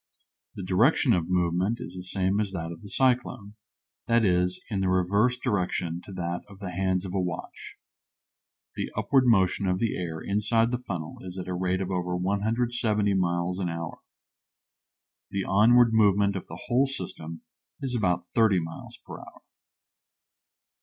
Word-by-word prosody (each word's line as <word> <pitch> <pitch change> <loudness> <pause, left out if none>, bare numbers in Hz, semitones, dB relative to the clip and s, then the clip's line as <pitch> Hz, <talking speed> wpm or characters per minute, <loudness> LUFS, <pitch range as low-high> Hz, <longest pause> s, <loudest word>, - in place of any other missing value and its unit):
The 95 - -6
direction 115 - +3
of 85 -3 0
movement 90 +5 +1
is - - -7
the 90 - -7
same 95 +2 0
as 105 -2 0
that 85 -2 -4
of 85 - -9
the 100 - -10
cyclone 125 -5 0 0.5
that 115 -1 +3
is, 90 0 +1
in 100 - 0
the 95 -1 +1
reverse 100 +7 +2
direction 90 -7 -1
to - - -10
that 85 -1 -3
of 100 - -13
the 95 -2 -6
hands 95 +1 0
of 90 - -6
a 95 - +1
watch. 90 -2 -6 1.0
The - - -3
upward 135 -2 +3
motion 95 -3 +3
of 90 0 +1
the 115 +2 0
air 80 -3 -4
inside 105 +6 +1
of 115 - 0
the 125 - -1
funnel 80 -4 -5
is 90 0 -8
at 90 - -5
a 90 - -2
rate 90 +1 0
of 95 0 -3
over 90 -1 -1
170 105 +2 0
miles 90 0 0
an 90 -2 -1
hour. 85 0 -5 1.3
The 100 -1 -2
onward 115 +5 +5
movement 100 -2 +4
of 95 - -5
the 85 +2 -9
whole 130 +3 +3
system 85 - -7 0.4
is 130 -3 -3
about 90 -6 +1
thirty 110 -5 +4
miles 80 0 -8
per - - -8
hour. - - -14
95 Hz, 170 wpm, -27 LUFS, 90-110 Hz, 1.3 s, onward